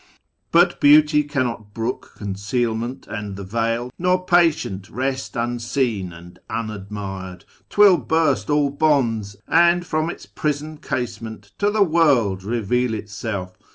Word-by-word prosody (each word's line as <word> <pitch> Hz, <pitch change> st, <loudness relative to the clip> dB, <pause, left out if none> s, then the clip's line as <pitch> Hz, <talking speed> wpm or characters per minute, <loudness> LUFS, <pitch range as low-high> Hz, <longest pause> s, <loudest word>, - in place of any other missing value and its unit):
But 175 Hz, +1 st, +4 dB
Beauty 150 Hz, +1 st, +6 dB
cannot 125 Hz, -8 st, -3 dB
brook 115 Hz, +2 st, -4 dB
Concealment 110 Hz, +4 st, -2 dB
and 105 Hz, -2 st, -6 dB
the 100 Hz, -, -7 dB
veil, 115 Hz, +4 st, -1 dB
nor 180 Hz, +1 st, +1 dB
patient 165 Hz, -, +2 dB
rest 130 Hz, +3 st, -3 dB
Unseen 115 Hz, -4 st, -1 dB
and 85 Hz, +1 st, -13 dB
unadmired: 100 Hz, -4 st, -6 dB, 0.2 s
'twill 205 Hz, -3 st, +6 dB
burst 145 Hz, -5 st, +1 dB
all 145 Hz, -1 st, +2 dB
bonds, 120 Hz, -9 st, +1 dB
And 170 Hz, +2 st, +4 dB
from 155 Hz, -1 st, -1 dB
Its -, -, -8 dB
prison 150 Hz, +1 st, -3 dB
casement 115 Hz, -5 st, -5 dB
to 205 Hz, -, +3 dB
the 210 Hz, 0 st, +3 dB
world 140 Hz, -, +3 dB
Keveal 115 Hz, +3 st, 0 dB
Itself. 100 Hz, -3 st, -5 dB
120 Hz, 120 wpm, -22 LUFS, 105-150 Hz, 0.2 s, Beauty